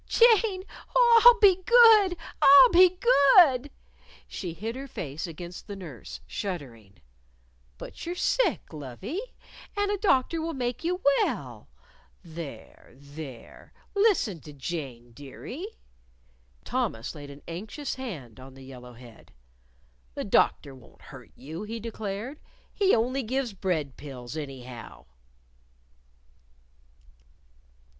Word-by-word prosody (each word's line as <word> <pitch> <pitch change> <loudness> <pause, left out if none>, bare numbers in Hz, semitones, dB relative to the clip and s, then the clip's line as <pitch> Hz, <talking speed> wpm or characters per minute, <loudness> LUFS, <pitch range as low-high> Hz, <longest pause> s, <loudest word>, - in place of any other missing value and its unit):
"Jane! 445 -5 +4 0.3
Oh, 475 -2 +6
I'll 485 -1 +8
be 385 -4 +5
good! 440 -5 +6 0.2
I'll 280 - +9
be 365 0 +5
good!" 285 - +5 0.6
She 175 -4 -6
hid 225 +6 -5
her 270 +1 -7
face 160 - -6
against 175 +2 -9
the 200 - -6
nurse, 165 -10 -10
shuddering. 125 - -7 0.8
"But - - -10
you're 345 +1 -4
sick, - - 0
lovie. 155 - -6 0.6
And 410 0 0
a 410 - -2
doctor 325 -4 +1
would 325 -1 -4
make 245 +1 -3
you 360 +2 -2 0.2
well. - - -3 0.5
There! 165 -8 -10
There! 140 -2 -12 0.2
Listen 400 - +2
to 150 0 -13
Jane, 135 -5 -6
dearie." 145 - -9 1.0
Thomas 115 +3 -3
laid 145 -3 -10
an 140 +1 -13
anxious 215 - -6
hand 155 - -8
on 130 +1 -13
the 135 - -13
yellow 125 -2 -12
head. 120 -1 -16 0.8
"The - - -3
doctor 140 - +1
won't 130 -3 -18
hurt - - -12
you," 160 +6 -8
he 225 +2 -6
declared. 220 +4 -6 0.3
"He 390 -2 +3
only 250 +4 0
gives 255 -1 -2
bread 165 -8 -3
pills, 130 -2 -9
anyhow." 130 -5 -9
200 Hz, 120 wpm, -27 LUFS, -, 1.0 s, I'll